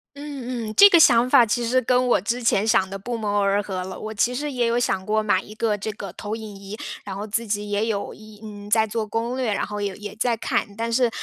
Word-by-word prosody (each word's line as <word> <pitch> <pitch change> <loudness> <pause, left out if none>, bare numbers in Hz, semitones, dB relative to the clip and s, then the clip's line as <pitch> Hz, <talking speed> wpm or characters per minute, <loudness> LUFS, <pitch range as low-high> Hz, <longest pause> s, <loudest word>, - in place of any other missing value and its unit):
嗯 255 -5 -5
嗯， 215 - -5
这 405 - +9
个 345 - +6
想 245 -5 +5
法 255 -3 +6
其 240 +2 -1
实 255 +2 +2
跟 250 +1 +2
我 - - +4
之 235 +6 -3
前 220 -2 +2
想 190 -3 +3
的 195 +1 -6
不 235 +4 -4
谋 205 -2 -1
而 200 +1 +1
合 190 -2 -4
了， 185 +1 -6
我 215 0 -6
其 240 +4 +1
实 295 +3 -3
也 245 -3 0
有 230 +1 +1
想 195 -6 0
过 215 0 +1
买 210 - +2
一 210 - -12
个 215 -1 0
这 210 +2 -5
个 200 -1 -7
投 210 +1 -4
影 215 -3 -8
仪， 200 +2 -9 0.3
然 195 - -6
后 200 +2 -5
自 225 +2 -2
己 205 0 -2
也 205 +1 0
有 210 -3 -3
一 215 -1 -15
嗯， 205 -1 -9
在 220 +1 +4
做 220 0 -3
攻 230 +4 -2
略， 245 -5 0
然 - - -1
后 210 0 -6
也 200 -2 -3
也 205 0 -8
在 240 +1 +1
看。 225 - -1
但 230 +2 -3
是， 245 0 +3
220 Hz, 290 characters per minute, -23 LUFS, 205-240 Hz, 0.3 s, 这